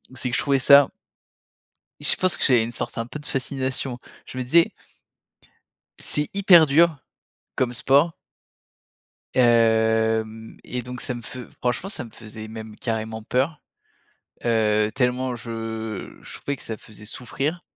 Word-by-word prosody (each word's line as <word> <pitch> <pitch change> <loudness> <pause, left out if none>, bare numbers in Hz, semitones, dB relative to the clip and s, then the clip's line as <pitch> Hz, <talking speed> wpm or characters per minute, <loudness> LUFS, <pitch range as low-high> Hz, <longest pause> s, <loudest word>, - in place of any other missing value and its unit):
c'est 125 0 -3
que 120 - -1
je - - +1
trouvais 140 -2 +2
ça 140 +1 +8 1.1
Je - - +2
pense 185 -1 +1
que - - -3
j'avais 125 -5 +5
une 115 - -4
sorte - - -5
un 115 - -1
peu 135 +5 -8
de 145 - -14
fascination. 130 -1 -2 0.3
Je - - -9
me 130 - -1
disais: 165 +7 +4 1.3
«c'est 150 0 -1
hyper 190 -5 +7
dur, 160 +2 +4 0.6
comme 125 -1 0
sport». 140 +6 +4 1.2
Hem 110 -2 +2
et 125 0 -4
donc 125 +1 -7
ça 125 - -3
me 120 - -7
fe 130 - -8 0.2
franchement, 125 +10 -1
ça 200 - -4
me 115 - -13
faisait 110 0 -9
même 110 -1 -8
carrément 110 -1 -3
peur. 135 +5 0 0.8
Heu, 110 -2 +2
tellement 125 0 0
je 110 -2 -6
je - - -9
trouvais 140 0 -3
que - - -13
ça 110 - -5
faisait 110 0 -14
souffrir. 140 +9 -3
125 Hz, 150 wpm, -24 LUFS, 110-140 Hz, 1.3 s, ça